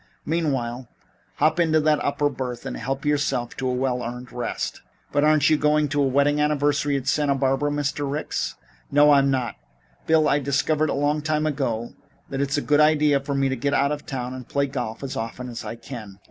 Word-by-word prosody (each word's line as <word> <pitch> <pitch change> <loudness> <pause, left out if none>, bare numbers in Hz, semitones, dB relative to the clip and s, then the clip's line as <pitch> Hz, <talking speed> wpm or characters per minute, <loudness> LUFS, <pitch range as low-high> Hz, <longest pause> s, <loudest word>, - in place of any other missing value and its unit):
Meanwhile, 130 -7 -1 0.5
hop 155 +3 +2
into 160 -2 +3
that 155 -1 +2
upper 145 +1 +1
berth 125 -3 -5
and - - -4
help 135 +4 -4
yourself 145 -5 0
to 130 - -2
a 125 - 0
well 125 -1 0
earned 125 +1 -6
rest." 120 - -4 0.3
"But 145 - +2
aren't 155 0 +4
you 155 - +5
going 150 0 +2
to 145 +1 +1
a 140 - +3
wedding 140 +2 +2
anniversary 145 -1 +1
at 130 - -5
Santa 145 0 +2
Barbara, 135 +2 +1
Mr. 145 -1 -2
Ricks?" 150 +2 -3 0.4
"I 145 0 +6
am 140 0 +2
not. 125 -5 -1 0.5
Bill, 160 -1 +4
I 145 - +3
discovered 145 +3 +1
a - - 0
long 145 +2 +1
time 155 0 0
ago 125 -6 -2 0.4
that 135 0 -2
it's 140 +1 0
a - - +1
good 150 0 +3
idea 150 -2 +4
for 140 +1 -4
me 135 0 +2
to 130 - -1
get 140 +3 0
out 140 +1 +2
of 150 0 -5
town 125 -2 -4
and 130 -2 -9
play 140 0 +1
golf 125 -4 -5
as 135 - -4
often 115 +3 -5
as 120 -1 -6
I - - -5
can. 115 -4 -9
140 Hz, 210 wpm, -24 LUFS, 130-150 Hz, 0.5 s, I